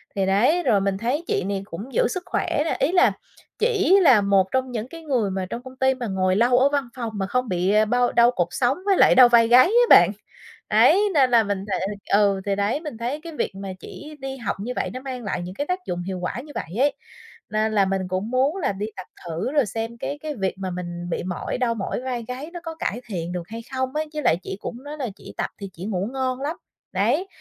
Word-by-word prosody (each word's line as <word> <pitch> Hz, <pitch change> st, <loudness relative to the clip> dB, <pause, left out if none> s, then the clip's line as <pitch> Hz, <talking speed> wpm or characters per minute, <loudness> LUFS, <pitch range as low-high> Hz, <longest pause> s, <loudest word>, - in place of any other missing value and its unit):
Thì 195 Hz, -1 st, +1 dB
đấy, 240 Hz, -, +3 dB
rồi 205 Hz, -9 st, +3 dB
mình 195 Hz, 0 st, 0 dB
thấy 250 Hz, -, -1 dB
chị -, -, 0 dB
này 195 Hz, +1 st, -2 dB
cũng 210 Hz, +7 st, -8 dB
giữ -, -, +3 dB
sức 365 Hz, -4 st, -4 dB
khỏe 360 Hz, -, -1 dB
nè, -, -, 0 dB
ý 285 Hz, -, +2 dB
là 370 Hz, +1 st, +5 dB, 0.5 s
chỉ 405 Hz, -4 st, +4 dB
là 260 Hz, -, +6 dB
một 200 Hz, -1 st, +3 dB
trong 260 Hz, -1 st, 0 dB
những 230 Hz, -1 st, -4 dB
cái 330 Hz, +5 st, -10 dB
người 245 Hz, -10 st, 0 dB
mà 190 Hz, 0 st, -2 dB
trong 240 Hz, -, -5 dB
công 260 Hz, 0 st, -11 dB
ty 265 Hz, 0 st, +3 dB
mà 250 Hz, -2 st, -5 dB
ngồi 185 Hz, -1 st, +1 dB
lâu 240 Hz, +4 st, +4 dB
ở 265 Hz, +2 st, +5 dB
văn 280 Hz, -3 st, -1 dB
phòng 235 Hz, -3 st, -4 dB
mà 195 Hz, -2 st, -2 dB
không 250 Hz, +2 st, -1 dB
bị, 180 Hz, +1 st, +1 dB
ơ, 215 Hz, +1 st, +4 dB
bao 245 Hz, +2 st, +2 dB
đau 235 Hz, +1 st, +5 dB
cột 175 Hz, -8 st, 0 dB
sống 255 Hz, +2 st, +1 dB
với 395 Hz, -2 st, +3 dB
lại -, -, +6 dB
đau 250 Hz, -1 st, +8 dB
vai 235 Hz, -1 st, +5 dB
gáy 245 Hz, +2 st, +7 dB
á 475 Hz, +5 st, +4 dB
bạn. -, -, +8 dB, 0.6 s
Đấy, 400 Hz, -, +5 dB
nên 270 Hz, -5 st, +4 dB
là 235 Hz, -2 st, +6 dB
mình 200 Hz, -2 st, -3 dB
th 200 Hz, 0 st, -4 dB
ừ, 200 Hz, -1 st, +3 dB
thì 200 Hz, -1 st, 0 dB
đấy, 205 Hz, +9 st, 0 dB
mình 300 Hz, -8 st, -7 dB
thấy 245 Hz, +6 st, -3 dB
cái 335 Hz, 0 st, -9 dB
việc -, -, -1 dB
mà 195 Hz, -1 st, -6 dB
chỉ 300 Hz, +9 st, -10 dB
đi 270 Hz, 0 st, -5 dB
học 235 Hz, -6 st, -3 dB
như 235 Hz, +5 st, -4 dB
vậy -, -, -1 dB
nó 255 Hz, -, -5 dB
mang 260 Hz, -2 st, -6 dB
lại 200 Hz, -4 st, -3 dB
những 180 Hz, +2 st, -7 dB
cái 285 Hz, -, -3 dB
tác 365 Hz, +1 st, -1 dB
dụng 175 Hz, 0 st, -3 dB
hiệu 185 Hz, 0 st, -4 dB
quả 180 Hz, +6 st, -3 dB
như 300 Hz, -, -12 dB
vậy -, -, -3 dB
ấy, 285 Hz, +2 st, +3 dB, 0.6 s
nên 215 Hz, +1 st, 0 dB
là 200 Hz, -2 st, +4 dB
mình 190 Hz, 0 st, -1 dB
cũng 185 Hz, +4 st, -3 dB
muốn 265 Hz, +5 st, +2 dB
là 340 Hz, -, 0 dB
đi 200 Hz, +2 st, -4 dB
tập 185 Hz, -, -8 dB, 0.2 s
thử 170 Hz, +9 st, -3 dB
rồi 290 Hz, -3 st, +3 dB
xem 225 Hz, +3 st, -5 dB
cái 285 Hz, +5 st, -4 dB
cái 305 Hz, -1 st, -4 dB
việc 195 Hz, -4 st, -1 dB
mà 190 Hz, -1 st, -4 dB
mình 175 Hz, -1 st, -5 dB
bị -, -, -2 dB
mỏi, 180 Hz, -1 st, -3 dB
đau 245 Hz, -2 st, 0 dB
mỏi 210 Hz, +3 st, -3 dB
vai 250 Hz, -3 st, -4 dB
gáy 260 Hz, +6 st, -6 dB
nó 350 Hz, -, -5 dB
có 325 Hz, -1 st, -6 dB
cải 245 Hz, -7 st, -3 dB
thiện 175 Hz, -6 st, -4 dB
được 180 Hz, -1 st, -4 dB
hay 225 Hz, +1 st, -7 dB
không 260 Hz, +1 st, -2 dB
ấy? 310 Hz, +1 st, 0 dB
Với 305 Hz, -, -3 dB
lại 165 Hz, -, +3 dB
chỉ 190 Hz, -, -5 dB
cũng 240 Hz, +4 st, -7 dB
nói 295 Hz, +1 st, -7 dB
là 255 Hz, -4 st, -2 dB
chỉ -, -, -12 dB
tập -, -, -1 dB
thì 200 Hz, -1 st, -6 dB
chỉ 175 Hz, +2 st, -8 dB
ngủ 200 Hz, -1 st, -2 dB
ngon 260 Hz, -1 st, -2 dB
lắm. 300 Hz, +4 st, -2 dB, 0.4 s
Đấy, 380 Hz, -, +1 dB
235 Hz, 265 wpm, -23 LUFS, 195-270 Hz, 0.6 s, đau